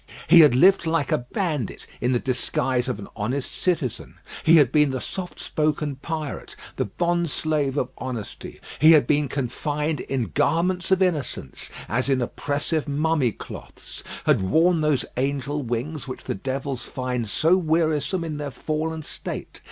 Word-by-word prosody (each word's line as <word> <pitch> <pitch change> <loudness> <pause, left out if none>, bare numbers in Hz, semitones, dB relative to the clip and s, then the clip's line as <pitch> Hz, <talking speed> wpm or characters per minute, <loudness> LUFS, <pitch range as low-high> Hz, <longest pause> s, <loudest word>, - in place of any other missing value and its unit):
He 170 +1 +8
had 150 -6 +7
lived 180 +4 +5
like 160 -4 0
a - - +3
bandit 155 - -2 0.2
in 125 - +1
the 125 - +3
disguise 125 0 0
of 125 -5 -2
an 100 - -8
honest 125 +6 -2
citizen. 165 - -1 0.3
He 165 - +6
had 145 -6 +6
been 150 -1 +4
the 130 -1 -2
soft 185 +5 -5
spoken 150 -2 -1
pirate; 155 0 -5 0.2
the - - +1
bond 170 - 0
slave 150 -2 0
of 125 - 0
honesty. 125 -5 -6 0.2
He 160 +2 +8
had 150 - +6
been 150 -1 +2
confined 145 +3 -2
in 130 -4 -2
garments 170 +4 +1
of 190 0 +4
innocence, 165 -6 -2 0.2
as 125 +5 0
in 135 -1 +3
oppressive 145 +5 -1
mummy 145 -3 +1
cloths; - - -10 0.2
had - - +4
worn 160 - +3
those 150 -3 +2
angel 140 +2 -1
wings 130 +5 -3
which 130 - -7
the - - -2
devils 130 +3 -4
find 125 -3 -3
so 165 - +3
wearisome 160 0 +1
in 155 -3 -4
their 145 -1 -4
fallen 155 +4 -3
state. - - -7
145 Hz, 160 wpm, -24 LUFS, 130-160 Hz, 0.3 s, He